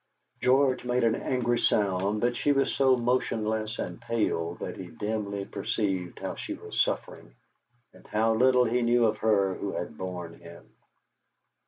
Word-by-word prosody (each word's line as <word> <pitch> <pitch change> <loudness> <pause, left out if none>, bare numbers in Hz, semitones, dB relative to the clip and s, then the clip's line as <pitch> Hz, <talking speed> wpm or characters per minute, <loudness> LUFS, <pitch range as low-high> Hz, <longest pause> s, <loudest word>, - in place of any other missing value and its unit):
George 130 0 +3
made 125 0 0
an 115 -1 +4
angry 120 -1 0
sound, 100 +1 +1
but 120 0 +1
she 145 - +2
was 135 -1 +1
so 135 -2 +4
motionless 110 -2 -1
and - - -5
pale 105 -8 -1
that - - -6
he 95 - -8
dimly 100 0 -3
perceived 95 -3 -2
how - - -4
she - - -5
was - - -2
suffering, - - -3 0.6
and - - -18
how 110 +1 +2
little 125 +2 +4
he 120 +2 +1
knew 120 0 +3
of 110 -1 0
her 100 -3 +2
who 100 +1 -4
had 85 -3 -5
borne 90 -2 -5
him. 85 0 -13
110 Hz, 160 wpm, -28 LUFS, 95-120 Hz, 0.6 s, an